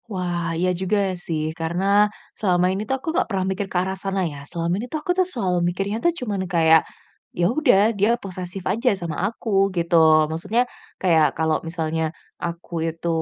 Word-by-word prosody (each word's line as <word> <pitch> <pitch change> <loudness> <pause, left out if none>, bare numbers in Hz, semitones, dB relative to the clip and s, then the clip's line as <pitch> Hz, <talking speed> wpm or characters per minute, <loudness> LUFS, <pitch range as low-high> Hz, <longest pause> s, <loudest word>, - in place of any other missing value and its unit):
Wah 175 -4 -2
iya 180 +2 +1
juga 190 +4 0 0.2
sih, 160 -3 -3
karena 170 +3 -2 0.5
selama 180 -3 +1
ini 195 - -2
tuh 265 - +1
aku 265 - -16
nggak 370 +2 +1
pernah 190 -3 -1
mikir 190 +1 -2
ke 185 - -2
arah 185 +1 0
sana 190 0 -1
ya, 145 -4 -5
selama 170 0 -1
ini 245 - -7
tuh 310 - -2
aku 360 - -1
tuh 370 0 +2
selalu 185 - +1
mikirnya 200 +5 -3
tuh 345 - +4
cuman 210 -6 -2
kayak, 160 -2 +5 0.6
ya 175 - +2
sudah, 230 -7 +4
dia 210 +3 +2
posesif 185 -2 -7
aja 230 +7 +1
sama 170 -3 -4
aku 200 -4 +1
gitu. 170 0 +1 0.4
Maksudnya 215 +10 0 0.4
kayak 165 -4 +3
kalau 160 0 +1
misalnya 160 -1 -2 0.4
aku 170 -1 -4
itu 165 +1 -6
185 Hz, 180 wpm, -22 LUFS, 170-205 Hz, 0.6 s, kayak